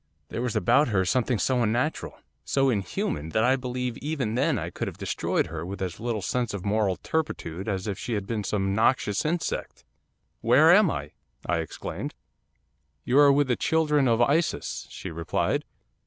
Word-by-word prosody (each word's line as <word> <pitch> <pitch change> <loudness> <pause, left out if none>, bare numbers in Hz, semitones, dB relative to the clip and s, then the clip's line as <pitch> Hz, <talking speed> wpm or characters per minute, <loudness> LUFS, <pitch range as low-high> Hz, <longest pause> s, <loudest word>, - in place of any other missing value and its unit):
There - - -4
was 125 -2 -2
about 110 - +4
her 95 -5 +1
something 125 +4 +1
so 125 +5 +1
unnatural, 120 +7 -1 0.3
so 135 -1 +2
inhuman, 90 -7 -2
that 110 +7 +1
I 130 +2 +4
believe 125 -2 -3
even 140 -7 -2
then 135 +3 +1
I - - -4
could - - -4
have - - -6
destroyed - - -1
her 80 0 -6
with 95 +3 -6
as 95 -1 -4
little 115 -3 -2
sense 120 -2 -1
of 95 - -6
moral 100 -2 +1
turpitude 100 - -3
as 95 -3 -2
if 100 -3 -3
she 120 - -3
had 100 -3 -2
been 110 0 -2
some 95 0 -1
noxious 110 -1 +2
insect. 165 +2 -2 0.6
'"Where 130 +8 +6
am 200 -2 +6
I?" 75 0 -4 0.3
I 85 -1 0
exclaimed. 80 - -5 0.9
'"You 130 +3 +3
are 145 -1 +7
with 145 0 +3
the 125 - +2
children 150 -3 +2
of 115 0 +4
Isis," 155 +6 0
she - - -7
replied. 80 -1 -1
115 Hz, 180 wpm, -26 LUFS, 95-135 Hz, 0.9 s, are